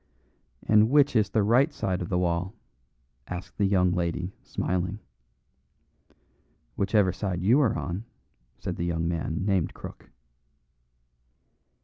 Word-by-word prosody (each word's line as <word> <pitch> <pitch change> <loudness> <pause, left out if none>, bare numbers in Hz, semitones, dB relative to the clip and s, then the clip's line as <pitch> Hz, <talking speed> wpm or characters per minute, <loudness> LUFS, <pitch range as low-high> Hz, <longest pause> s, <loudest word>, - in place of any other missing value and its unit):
"And 110 +1 +5
which 145 -1 +4
is 105 -3 +3
the 110 +1 +2
right 125 +9 +4
side 95 -10 -2
of 85 - -4
the 90 - 0
wall?" 90 +3 -1 0.7
asked 90 +2 -7
the 100 - +3
young 90 -2 +3
lady, 90 +1 -2
smiling. 90 +2 -2 1.8
"Whichever 100 -1 +2
side 90 -3 -3
you 120 +9 +5
are 125 - +2
on," 95 +6 -4 0.5
said - - -5
the 85 - -2
young 85 -1 -1
man 85 +2 -2
named 95 -5 0
Crook. - - -10
95 Hz, 125 wpm, -27 LUFS, 90-105 Hz, 1.8 s, And